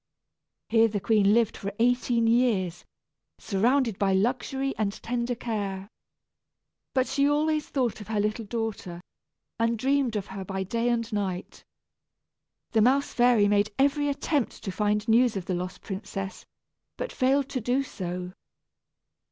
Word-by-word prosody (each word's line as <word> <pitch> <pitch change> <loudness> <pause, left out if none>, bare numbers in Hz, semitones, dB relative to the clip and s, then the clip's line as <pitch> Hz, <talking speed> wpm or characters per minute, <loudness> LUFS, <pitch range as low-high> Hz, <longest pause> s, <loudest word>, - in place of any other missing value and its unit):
Here 225 0 +4
the 210 -2 -2
queen 205 -1 +3
lived 230 0 +3
for 200 - -5
eighteen 240 0 +2
years, 225 -7 +1 0.5
surrounded 230 +2 +1
by 195 -1 +2
luxury 255 +6 0
and 210 -2 0
tender 240 +1 -1
care. 200 -4 -4 1.1
But 260 -1 +3
she 280 +1 +2
always 305 +1 +1
thought 250 -6 -1
of 205 - -9
her 215 -1 -1
little 215 +2 -1
daughter, 210 -6 -4 0.6
and 230 0 +1
dreamed 265 -1 +1
of 205 -2 -2
her 195 -1 -7
by 190 0 -3
day 230 +5 -1
and 230 -1 -1
night. 190 -3 -3 1.1
The 225 - +3
mouse 270 +5 +3
fairy 240 -4 +4
made 205 +1 +2
every 285 +1 +2
attempt 285 -1 -1
to 195 - -3
find 210 +2 0
news 230 -1 +4
of 185 - -5
the 190 - -2
lost 180 +1 -4
princess, 195 -1 -6 0.5
but - - -4
failed 265 +1 +2
to 255 - -3
do 250 +5 +1
so. 180 -6 -5
225 Hz, 145 wpm, -27 LUFS, 200-250 Hz, 1.1 s, Here